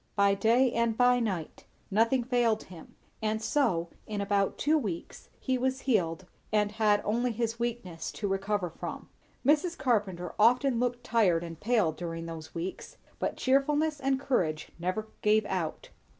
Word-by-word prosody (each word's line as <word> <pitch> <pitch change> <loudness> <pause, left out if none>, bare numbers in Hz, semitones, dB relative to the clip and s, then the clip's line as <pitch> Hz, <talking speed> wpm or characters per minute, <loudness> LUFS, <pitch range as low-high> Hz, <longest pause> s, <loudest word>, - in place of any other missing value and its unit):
By 200 -1 +4
day 235 +5 +3
and 235 -1 0
by 245 0 +5
night; 190 -9 -3 0.3
nothing 230 +5 +3
failed 235 -3 +1
him; 170 -3 -13 0.3
and 215 0 0
so, 220 - +1 0.2
in 210 -1 -3
about 200 -1 +1
two 305 +3 +2
weeks, 205 - -4
he 260 -2 -1
was 260 +1 0
healed 185 -8 0 0.3
and 210 -1 +2
had 210 -1 +2
only 240 +3 +1
his 230 0 -2
weakness 230 -8 -3
to 205 - -3
recover 195 -2 -1
from. - - -7 0.4
Mrs. 310 +5 +3
Carpenter 200 -8 0
often 245 +3 +4
looked 245 0 -1
tired 200 -8 +2
and 165 -2 -8
pale 215 -7 +2
during 165 +1 -5
those 165 -1 -8
weeks, 170 +3 -5 0.2
but - - -2
cheerfulness 295 +3 +2
and 270 -1 +1
courage 175 - -1
never 185 +5 -2
gave 215 0 +3
out. 165 -4 -3
220 Hz, 155 wpm, -29 LUFS, 185-245 Hz, 0.4 s, by